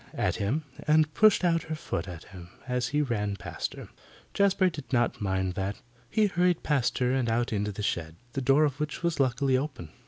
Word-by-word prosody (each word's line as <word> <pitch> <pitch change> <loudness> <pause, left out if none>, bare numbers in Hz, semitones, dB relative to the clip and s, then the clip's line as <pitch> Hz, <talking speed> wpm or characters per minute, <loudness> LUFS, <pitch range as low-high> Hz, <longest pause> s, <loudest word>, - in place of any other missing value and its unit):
at - - 0
him, 125 +11 -1 0.2
and 155 0 +4
pushed 215 +1 +5
out 165 -2 +3
her 160 0 -5
foot 155 -9 -4
at 85 -3 -8
him 90 -2 -12 0.2
as 125 0 0
he 150 +1 +1
ran 105 -6 -1
past 90 - -5
her. - - -9 0.5
Jazbury 195 -2 +3
did 145 -4 -9
not 120 -4 +1
mind 95 -2 0
that. 100 +2 -3 0.3
He 215 - +3
hurried 180 -3 +2
on - - -28
past 140 -5 +1
her, 125 -1 +1
and 130 -3 +1
out 115 +1 0
into 105 0 -1
the 105 +1 -6
shed, 80 -5 -2 0.2
the 135 - -2
door 135 +4 +4
of 145 -1 0
which 150 +2 -3
was 170 -3 0
luckily 130 0 +2
open. 130 - -3
130 Hz, 215 wpm, -28 LUFS, 105-155 Hz, 0.5 s, pushed